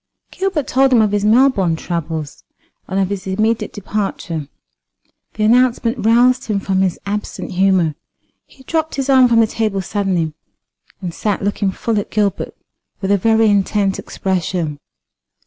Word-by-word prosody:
Gilbert 375 Hz, -7 st, -1 dB
told 265 Hz, +1 st, +2 dB
him 245 Hz, -, +5 dB
of 215 Hz, -2 st, +3 dB
his 205 Hz, -1 st, 0 dB
Melbourne 215 Hz, -6 st, +3 dB
troubles, 160 Hz, -3 st, -5 dB, 0.4 s
and 190 Hz, +1 st, -1 dB
of 190 Hz, -1 st, +1 dB
his 195 Hz, -1 st, -4 dB
immediate 215 Hz, +4 st, 0 dB
departure. 195 Hz, -7 st, -4 dB, 0.9 s
The 215 Hz, -, -1 dB
announcement 240 Hz, +1 st, +2 dB
roused 245 Hz, +3 st, +4 dB
him 210 Hz, -3 st, -1 dB
from 190 Hz, -1 st, 0 dB
his 185 Hz, -3 st, 0 dB
absent 205 Hz, +1 st, -4 dB
humour. 185 Hz, -4 st, +2 dB, 0.5 s
He 265 Hz, -, -19 dB
dropped 320 Hz, +3 st, -2 dB
his 275 Hz, 0 st, -1 dB
arm 260 Hz, -1 st, +6 dB
from 230 Hz, -1 st, +4 dB
the -, -, +5 dB
table 215 Hz, -2 st, -1 dB
suddenly, 185 Hz, -5 st, -1 dB, 0.7 s
and 175 Hz, -3 st, -4 dB
sat 205 Hz, +1 st, -2 dB
looking 200 Hz, 0 st, 0 dB
full 215 Hz, +3 st, -1 dB
at 205 Hz, -, -5 dB
Gilbert 205 Hz, -3 st, -1 dB, 0.4 s
with 195 Hz, 0 st, -1 dB
a 200 Hz, -, +4 dB
very 225 Hz, +2 st, +3 dB
intent 200 Hz, -1 st, +1 dB
expression. 175 Hz, -5 st, -2 dB
205 Hz, 150 wpm, -18 LUFS, 190-230 Hz, 0.9 s, arm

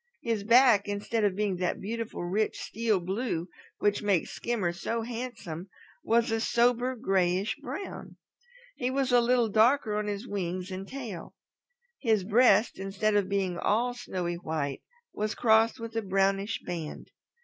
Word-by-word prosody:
His 225 Hz, -4 st, -1 dB
back, 235 Hz, -2 st, +5 dB
instead 205 Hz, +2 st, -1 dB
of 200 Hz, -3 st, +2 dB
being 200 Hz, -2 st, 0 dB
that 180 Hz, 0 st, -1 dB
beautiful 225 Hz, -1 st, -4 dB
rich 200 Hz, +5 st, -1 dB
steel 220 Hz, -3 st, 0 dB
blue 185 Hz, -1 st, -2 dB, 0.3 s
which 205 Hz, 0 st, +1 dB
makes 200 Hz, -5 st, +1 dB
Skimmer 210 Hz, -8 st, -1 dB
so 225 Hz, +5 st, -3 dB
handsome, 225 Hz, -8 st, -6 dB, 0.3 s
was 230 Hz, 0 st, +2 dB
a 225 Hz, 0 st, 0 dB
sober 245 Hz, +2 st, +2 dB
grayish 190 Hz, -3 st, +1 dB
brown. 285 Hz, +11 st, -7 dB, 0.6 s
He 250 Hz, -2 st, -1 dB
was 265 Hz, 0 st, 0 dB
a 245 Hz, -1 st, +6 dB
little 240 Hz, -1 st, +3 dB
darker 220 Hz, +1 st, +3 dB
on 210 Hz, 0 st, -1 dB
his 205 Hz, +3 st, -4 dB
wings 185 Hz, -2 st, -3 dB
and 190 Hz, +1 st, -6 dB
tail. 235 Hz, -9 st, -7 dB, 0.6 s
His 220 Hz, -6 st, +2 dB
breast, 215 Hz, 0 st, +4 dB
instead 200 Hz, +2 st, 0 dB
of 200 Hz, -2 st, +2 dB
being 190 Hz, -3 st, -1 dB
all 240 Hz, +4 st, +1 dB
snowy 180 Hz, -7 st, -4 dB
white, 155 Hz, -5 st, -3 dB, 0.3 s
was 215 Hz, 0 st, -2 dB
crossed 225 Hz, +1 st, +3 dB
with 230 Hz, 0 st, -7 dB
a 225 Hz, -, +1 dB
brownish 195 Hz, +1 st, 0 dB
band. 165 Hz, -4 st, -6 dB
210 Hz, 150 wpm, -29 LUFS, 190-235 Hz, 0.6 s, a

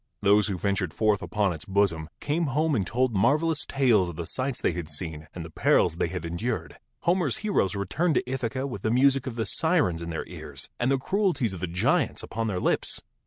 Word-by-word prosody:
Those 105 Hz, +1 st, +5 dB
who 100 Hz, -3 st, -2 dB
ventured 95 Hz, -3 st, -1 dB
forth 105 Hz, -2 st, +2 dB
upon 105 Hz, -3 st, 0 dB
its 80 Hz, -, -8 dB
bosom 95 Hz, -5 st, +1 dB
came 155 Hz, +3 st, 0 dB
home 150 Hz, +3 st, +1 dB
and 100 Hz, -8 st, 0 dB
told 125 Hz, +1 st, +1 dB
marvelous 150 Hz, +10 st, +2 dB
tales 120 Hz, -10 st, +3 dB
of 85 Hz, -, -7 dB
the 85 Hz, +1 st, -4 dB
sights 130 Hz, +7 st, -2 dB
they -, -, +1 dB
had 85 Hz, -2 st, -5 dB
seen 80 Hz, 0 st, -5 dB
and 85 Hz, -2 st, -5 dB
the 80 Hz, -, -10 dB
perils 80 Hz, -, +3 dB
they -, -, +1 dB
had 90 Hz, -1 st, -5 dB
endured. 85 Hz, -1 st, -3 dB, 0.2 s
Homer's 170 Hz, -6 st, +1 dB
heroes 105 Hz, -, +1 dB
returned 150 Hz, -, 0 dB
to -, -, 0 dB
Ithaca 130 Hz, 0 st, -2 dB
with 120 Hz, -8 st, -5 dB
the 110 Hz, -, 0 dB
music 135 Hz, +2 st, +3 dB
of 125 Hz, -, -4 dB
the 115 Hz, -1 st, -1 dB
sirens 145 Hz, -, +2 dB
in 85 Hz, -, -5 dB
their 80 Hz, -, -4 dB
ears -, -, -8 dB
and 120 Hz, -, +1 dB
the 135 Hz, -, +3 dB
cruelties 175 Hz, -, 0 dB
of 95 Hz, -, -6 dB
the 90 Hz, -, -2 dB
giants 85 Hz, +2 st, +1 dB
upon 115 Hz, 0 st, -3 dB
their 95 Hz, -4 st, -1 dB
lips. -, -, 0 dB
110 Hz, 215 wpm, -27 LUFS, 90-135 Hz, 0.2 s, Those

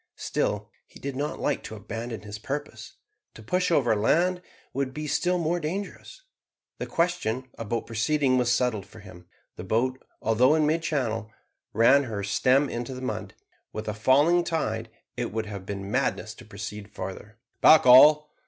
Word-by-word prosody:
Still -, -, -2 dB, 0.2 s
he -, -, -15 dB
did 140 Hz, -1 st, -5 dB
not 145 Hz, +4 st, -3 dB
like 145 Hz, -, -1 dB
to 110 Hz, -, -8 dB
abandon 115 Hz, +2 st, -6 dB
his 105 Hz, 0 st, -8 dB
purpose. 145 Hz, +5 st, -6 dB, 0.4 s
To 110 Hz, -, -12 dB
push 180 Hz, -, 0 dB
over 130 Hz, -9 st, +3 dB
land 175 Hz, -, +2 dB, 0.3 s
would 135 Hz, -1 st, -2 dB
be 155 Hz, 0 st, -4 dB
still 180 Hz, +4 st, +1 dB
more 170 Hz, +1 st, 0 dB
dangerous. 195 Hz, -, -6 dB, 0.6 s
The -, -, -4 dB
question 130 Hz, -8 st, -1 dB
about 115 Hz, +1 st, -4 dB
proceeding 130 Hz, +4 st, +1 dB
was 120 Hz, -1 st, +1 dB
settled 120 Hz, -5 st, 0 dB
for 110 Hz, -, -14 dB
him. 90 Hz, -3 st, -14 dB, 0.3 s
The -, -, -6 dB
boat, 125 Hz, +7 st, -1 dB, 0.2 s
although 125 Hz, +7 st, +3 dB
in 155 Hz, -1 st, +2 dB
mid 160 Hz, +2 st, +1 dB
channel, 115 Hz, -9 st, -2 dB, 0.4 s
ran 130 Hz, +6 st, +5 dB
her 105 Hz, -4 st, -4 dB
stem 130 Hz, +8 st, +2 dB
into 120 Hz, +1 st, -5 dB
the 130 Hz, -, -8 dB
mud. 130 Hz, -, -4 dB, 0.4 s
With 110 Hz, -, -6 dB
a 105 Hz, -, -1 dB
falling 145 Hz, +11 st, +3 dB
tide 115 Hz, -10 st, -2 dB, 0.3 s
it 120 Hz, -, -3 dB
would 110 Hz, +1 st, -2 dB
have 100 Hz, -3 st, -8 dB
been 100 Hz, 0 st, -5 dB
madness -, -, -1 dB
to -, -, -14 dB
proceed 105 Hz, 0 st, -8 dB
farther. 95 Hz, +4 st, -8 dB, 0.2 s
"Back 155 Hz, -3 st, +7 dB
all!" 150 Hz, +4 st, +7 dB
125 Hz, 170 wpm, -26 LUFS, 110-150 Hz, 0.6 s, Back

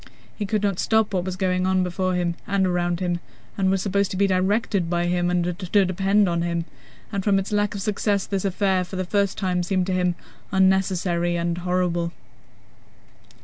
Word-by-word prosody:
He 205 Hz, -, -3 dB
could 210 Hz, 0 st, 0 dB
not 200 Hz, -3 st, 0 dB
stop 220 Hz, -2 st, +2 dB
what 180 Hz, -2 st, 0 dB
was 185 Hz, -1 st, -3 dB
going 185 Hz, 0 st, 0 dB
on 190 Hz, 0 st, +2 dB
before 185 Hz, +1 st, -1 dB
him 175 Hz, -1 st, 0 dB
and 195 Hz, -1 st, +2 dB
around 175 Hz, -1 st, 0 dB
him 175 Hz, -1 st, 0 dB, 0.4 s
and 190 Hz, -1 st, +1 dB
was 190 Hz, -1 st, +1 dB
supposed 200 Hz, -1 st, +1 dB
to 185 Hz, -, -4 dB
be 200 Hz, -, +3 dB
directed 190 Hz, -1 st, +1 dB
by 175 Hz, 0 st, 0 dB
him 175 Hz, 0 st, +1 dB
and 180 Hz, -1 st, +1 dB, 0.2 s
to 195 Hz, +1 st, +2 dB
depend 195 Hz, +2 st, +2 dB
on 170 Hz, -1 st, 0 dB
him, 170 Hz, -1 st, -1 dB, 0.5 s
and 200 Hz, -2 st, -2 dB
from 200 Hz, -1 st, +3 dB
its 195 Hz, +1 st, -2 dB
lack 205 Hz, -1 st, +1 dB
of 195 Hz, -, -4 dB
success 205 Hz, -1 st, 0 dB
this 195 Hz, -2 st, -2 dB
affair, 190 Hz, -1 st, +1 dB
for 180 Hz, +2 st, -8 dB
the 185 Hz, 0 st, -2 dB
first 200 Hz, +1 st, 0 dB
time, 180 Hz, -2 st, 0 dB
seemed 185 Hz, +1 st, 0 dB
to 190 Hz, -, -1 dB
him 180 Hz, -1 st, +1 dB, 0.4 s
unnecessary 185 Hz, -2 st, +2 dB
and 170 Hz, 0 st, -1 dB
horrible. 175 Hz, -1 st, 0 dB
185 Hz, 195 wpm, -23 LUFS, 175-195 Hz, 0.5 s, be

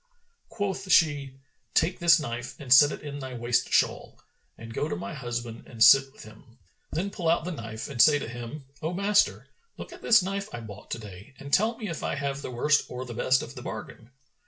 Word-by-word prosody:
Quoth 200 Hz, -3 st, -3 dB
she, 145 Hz, -4 st, +3 dB, 0.4 s
"Take 175 Hz, +3 st, +2 dB
this 170 Hz, -1 st, +6 dB
knife 125 Hz, -3 st, -6 dB
and 135 Hz, -4 st, +3 dB
set 145 Hz, +2 st, +7 dB
it -, -, -7 dB
in 145 Hz, -1 st, -6 dB
thy 130 Hz, -2 st, -7 dB
waist 120 Hz, 0 st, 0 dB
shawl -, -, +1 dB, 0.4 s
and 115 Hz, 0 st, -10 dB
go 150 Hz, -, -2 dB
to -, -, -2 dB
my 95 Hz, +3 st, -6 dB
husband 120 Hz, -4 st, -6 dB
and 115 Hz, -2 st, +1 dB
sit 135 Hz, +2 st, +7 dB
with -, -, -14 dB
him. 110 Hz, +3 st, -16 dB, 0.3 s
Then 190 Hz, +6 st, -3 dB
pull 170 Hz, -4 st, -2 dB
out 170 Hz, -1 st, +2 dB
the 180 Hz, -, -3 dB
knife 115 Hz, -7 st, -6 dB
and 130 Hz, -4 st, +1 dB
say 150 Hz, -2 st, +6 dB
to 145 Hz, -, -5 dB
him, 120 Hz, +5 st, -8 dB, 0.2 s
'O 160 Hz, +3 st, -2 dB
master, 200 Hz, +2 st, +2 dB, 0.3 s
look -, -, -9 dB
at -, -, -13 dB
this 230 Hz, -5 st, +5 dB
knife 195 Hz, +1 st, -4 dB
I 120 Hz, -, -6 dB
bought 105 Hz, -2 st, -11 dB
to -, -, -3 dB
day 105 Hz, +4 st, -12 dB
and 140 Hz, +1 st, -10 dB
tell 225 Hz, +3 st, +3 dB
me 215 Hz, -, -5 dB
if 165 Hz, -4 st, -5 dB
I -, -, -2 dB
have 140 Hz, -1 st, -3 dB
the -, -, -6 dB
worst 145 Hz, +5 st, +2 dB
or 125 Hz, +1 st, -6 dB
the 120 Hz, -, -8 dB
best 130 Hz, +3 st, +2 dB
of -, -, -9 dB
the -, -, -9 dB
bargain.' 115 Hz, -, -8 dB
135 Hz, 225 wpm, -27 LUFS, 120-165 Hz, 0.4 s, set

